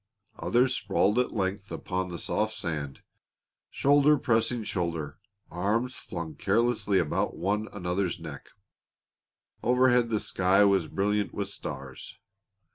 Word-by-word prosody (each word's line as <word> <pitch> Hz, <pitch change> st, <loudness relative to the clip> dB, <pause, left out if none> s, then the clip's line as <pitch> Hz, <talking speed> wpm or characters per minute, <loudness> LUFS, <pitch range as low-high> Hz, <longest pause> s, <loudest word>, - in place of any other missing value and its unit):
Others 125 Hz, +2 st, +2 dB
sprawled 105 Hz, +2 st, +1 dB
at 125 Hz, -, +1 dB
length 100 Hz, 0 st, -2 dB
upon 90 Hz, 0 st, -3 dB
the 85 Hz, -, -5 dB
soft 110 Hz, +5 st, -1 dB
sand, 75 Hz, -6 st, -4 dB, 0.7 s
shoulder 145 Hz, +1 st, +4 dB
pressing 115 Hz, -1 st, +1 dB
shoulder, 85 Hz, -7 st, -3 dB, 0.3 s
arms 110 Hz, +8 st, 0 dB
flung 80 Hz, -2 st, -6 dB
carelessly 105 Hz, +2 st, +1 dB
about 85 Hz, -5 st, 0 dB
one 105 Hz, +4 st, -1 dB
another's 90 Hz, -1 st, -2 dB
neck. -, -, -9 dB, 1.1 s
Overhead 125 Hz, -1 st, +3 dB
the 110 Hz, -2 st, +1 dB
sky 95 Hz, +2 st, +3 dB
was 95 Hz, -5 st, +3 dB
brilliant 100 Hz, +3 st, -1 dB
with 100 Hz, -1 st, -3 dB
stars. -, -, -8 dB
100 Hz, 120 wpm, -28 LUFS, 90-115 Hz, 1.1 s, shoulder